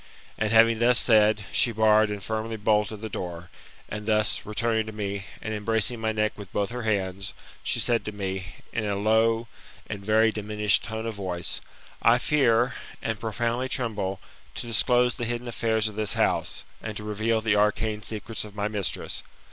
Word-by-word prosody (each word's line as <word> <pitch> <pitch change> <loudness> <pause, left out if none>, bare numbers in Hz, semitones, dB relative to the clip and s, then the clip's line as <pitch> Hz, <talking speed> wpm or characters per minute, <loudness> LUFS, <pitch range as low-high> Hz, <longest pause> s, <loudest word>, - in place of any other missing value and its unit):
And, 110 - 0
having 115 0 +6
thus 120 +1 +5
said, 110 -3 +5
she 120 - +3
barred 110 -1 +4
and 105 -2 -5
firmly 110 +2 -3
bolted 105 0 +1
the 110 - -3
door, 85 -4 -6 0.4
and 105 0 -6
thus, 110 -1 +1
returning 110 +1 0
to - - -4
me, 100 -2 -4 0.2
and 110 - -3
embracing 110 +2 0
my 110 0 +1
neck 110 0 0
with 100 -3 -10
both 100 +2 -1
her 125 0 -4
hands, 100 -3 -2 0.3
she - - 0
said 120 -1 +1
to 105 - -3
me, 95 -3 -4 0.3
in 115 - -1
a 100 -1 0
low 110 +3 +2 0.4
and 100 -2 -6
very 110 +2 +4
diminished 105 -1 +1
tone 110 0 -4
of 115 - -2
voice, 90 -4 -3 0.2
" - - -24
I 115 +1 +6
fear, 125 -3 +3 0.3
and 115 -2 -2
profoundly 120 +3 -1
tremble, 100 -7 -1 0.4
to - - -2
disclose 120 +2 +3
the 120 - -3
hidden 120 +1 -3
affairs 110 -2 +1
of 110 - -5
this 110 -1 0
house, - - 0 0.2
and 110 -1 -5
to 105 - -6
reveal 110 +2 0
the 110 -1 +2
arcane 105 +1 +1
secrets 110 +1 -4
of 105 -1 -11
my 105 0 -1
mistress. 105 -4 -2
110 Hz, 185 wpm, -26 LUFS, 105-115 Hz, 0.4 s, having